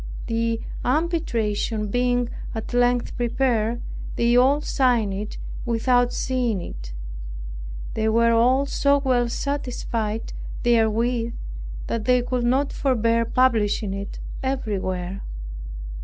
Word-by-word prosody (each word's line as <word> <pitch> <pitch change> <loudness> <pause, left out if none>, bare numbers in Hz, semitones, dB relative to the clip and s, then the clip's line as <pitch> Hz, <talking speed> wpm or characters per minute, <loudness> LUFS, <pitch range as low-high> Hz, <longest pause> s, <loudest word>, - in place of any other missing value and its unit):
The 230 0 0 0.2
arbitration 235 -9 0
being 245 +1 +1 0.3
at 220 +2 -5
length 245 0 +2
prepared, 240 -1 +1 0.3
they 235 +1 +3
all 265 +4 +5
signed 245 -9 +2
it 205 +2 -4 0.3
without 245 +1 +2
seeing 245 -6 0
it. - - -7 1.0
They 220 0 +1
were 230 +1 +4
all 250 +4 +4
so 280 0 +3
well 250 -4 +2
satisfied 235 -5 -2 0.3
therewith, 235 0 +2 0.5
that 225 -2 -2
they 250 0 +4
could 250 -1 -1
not 265 +4 +2
forbear 230 -4 +2
publishing 220 -5 +2
it 200 0 -5 0.2
everywhere. 195 -8 -2
235 Hz, 105 wpm, -24 LUFS, 220-250 Hz, 1.0 s, all